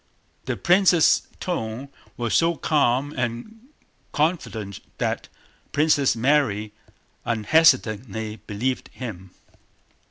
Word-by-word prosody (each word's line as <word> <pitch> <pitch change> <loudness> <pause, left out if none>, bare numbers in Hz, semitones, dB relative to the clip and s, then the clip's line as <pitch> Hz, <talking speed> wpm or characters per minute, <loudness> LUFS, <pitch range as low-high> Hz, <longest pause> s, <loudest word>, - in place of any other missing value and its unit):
The - - -2
prince's 180 -2 +4
tone 130 -6 -4 0.3
was 120 -2 -2
so 170 0 +3
calm 145 -2 +1
and 130 - -5 0.5
confident 130 - -1 0.2
that - - -2 0.5
Princess 145 -3 +3
Mary 115 -5 +1 0.5
unhesitatingly 110 -3 +2
believed 125 +5 -2
him. 95 -7 -8
130 Hz, 85 wpm, -23 LUFS, 110-155 Hz, 0.5 s, prince's